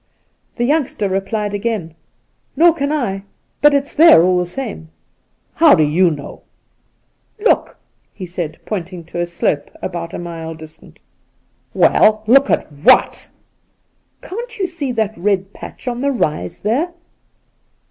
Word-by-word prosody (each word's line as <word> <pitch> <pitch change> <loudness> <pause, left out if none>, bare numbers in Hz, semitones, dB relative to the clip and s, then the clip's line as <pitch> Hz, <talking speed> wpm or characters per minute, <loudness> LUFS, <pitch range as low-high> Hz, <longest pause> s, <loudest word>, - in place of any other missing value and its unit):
The 240 - -2
youngster 275 -7 0
replied 205 +2 -2
again: 205 -6 -3 0.3
' - - -46
Nor 340 +1 +5
can 285 -2 -2
I, 230 -11 -2 0.4
but 295 +1 +6
it's 280 0 -1
there 305 - +7
all 180 0 +3
the 180 - -2
same.' 195 -6 -6 0.3
' - - -46
How 320 -3 +8
do 160 - +3
you 170 +5 +3
know 145 -3 -7 0.3
?' - - -45
' - - -45
Look,* - - +2 0.3
he 190 - -8
said, 170 -3 -5
pointing 180 -4 -5
to 175 +1 -7
a 175 - -1
slope 170 -4 -2
about 170 -2 -5
a - - -4
mile 165 -2 -7
distant. 155 0 -14 0.8
'Well, 215 0 +4
look 275 +5 +5
at - - 0
what?' 145 +2 +3 0.5
' - - -46
Can't 465 +4 -7
you 390 - -1
see 335 -7 -4
that 220 -2 -1
red 195 +1 -1
patch - - -11
on 245 0 -2
the 280 +1 +1
rise 170 - -2
there 280 - -1
200 Hz, 160 wpm, -18 LUFS, 170-275 Hz, 0.8 s, How